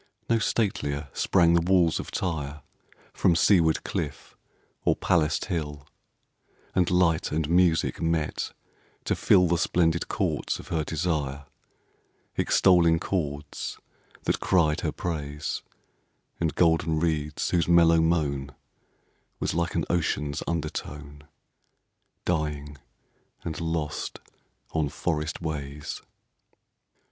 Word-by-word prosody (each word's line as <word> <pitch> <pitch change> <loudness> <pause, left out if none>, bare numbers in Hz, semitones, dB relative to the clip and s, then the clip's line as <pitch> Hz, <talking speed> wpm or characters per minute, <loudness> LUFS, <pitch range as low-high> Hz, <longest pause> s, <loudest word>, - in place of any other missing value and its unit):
No 115 -1 +3
statelier 80 -10 -1
sprang 85 -3 +3
the 85 - +4
walls 85 -2 +3
of - - -6
Tyre 75 -5 -3 0.5
From 85 - +3
seaward 85 -2 +4
cliff 70 -3 -4 0.5
or - - +3
palaced 80 -1 +1
hill; 75 -6 -4 0.9
And 90 -2 +2
light 90 -3 +2
and 75 0 0
music 85 -1 +2
met 80 -2 -1 0.5
to - - 0
fill 90 -1 +4
The 85 0 +1
splendid 85 0 +1
courts - - -1
of - - -11
her 80 -2 0
desire 75 -4 -2 0.5
— - - -42
(Extolling 85 -3 +4
chords 75 -5 -3 0.5
that - - 0
cried 80 -5 +2
her - - -1
praise, 75 -3 -4 0.8
And 80 -3 0
golden 80 -2 +3
reeds 75 -3 -1
whose 85 -2 +2
mellow 85 -1 +6
moan 70 -5 0 0.8
Was - - -1
like 85 0 -1
an - - +1
ocean's 75 -4 -1
undertone 75 -2 -5 1.0
Dying 75 -4 -2 0.6
and 80 -1 -4
lost 80 -2 -2 0.5
on 80 -3 0
forest 75 +2 -2
ways.) 75 -2 -5
80 Hz, 110 wpm, -27 LUFS, 75-85 Hz, 1.0 s, mellow